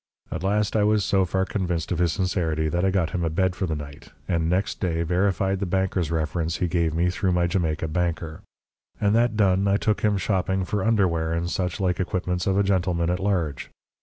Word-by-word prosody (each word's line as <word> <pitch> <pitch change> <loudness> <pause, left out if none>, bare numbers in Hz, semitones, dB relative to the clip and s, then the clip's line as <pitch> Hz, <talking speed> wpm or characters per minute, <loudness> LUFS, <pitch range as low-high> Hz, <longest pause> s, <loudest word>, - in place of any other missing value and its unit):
At 85 - -3
last, 105 +3 0
I 105 - +3
was 105 -1 +2
so 95 -1 +2
far 95 +1 0
convinced 90 -5 -2
of 90 - -1
his 85 -2 +2
sincerity 80 -5 0
that 85 +3 -1
I 95 - +3
got 90 -4 0
him 85 - -2
a 80 - +1
bed 95 +3 0
for 95 - -2
the 80 - -2
night, 70 -1 -9 0.2
and 85 -2 0
next 95 +3 0
day 85 -3 0
verified 95 +2 +1
the 100 - -2
banker's 95 -3 0
reference 80 +1 -1
he 90 - 0
gave 85 -2 0
me 90 +2 +2
through 95 0 0
my 90 0 +2
Jamaica 80 -3 -1
banker. 80 -1 -2 0.6
And 100 0 +2
that 115 -1 +2
done, 100 -1 +3
I 100 0 +3
took 105 -3 0
him 105 -2 +2
shopping 95 0 0
for 100 +1 -2
underwear 90 -8 +1
and 85 +1 -2
such 90 +2 -2
like 90 -2 0
equipments 90 -1 -1
of 95 0 +2
a 100 - +4
gentleman 90 -3 +1
at 90 - -1
large. 90 -9 -1
90 Hz, 220 wpm, -24 LUFS, 85-95 Hz, 0.6 s, a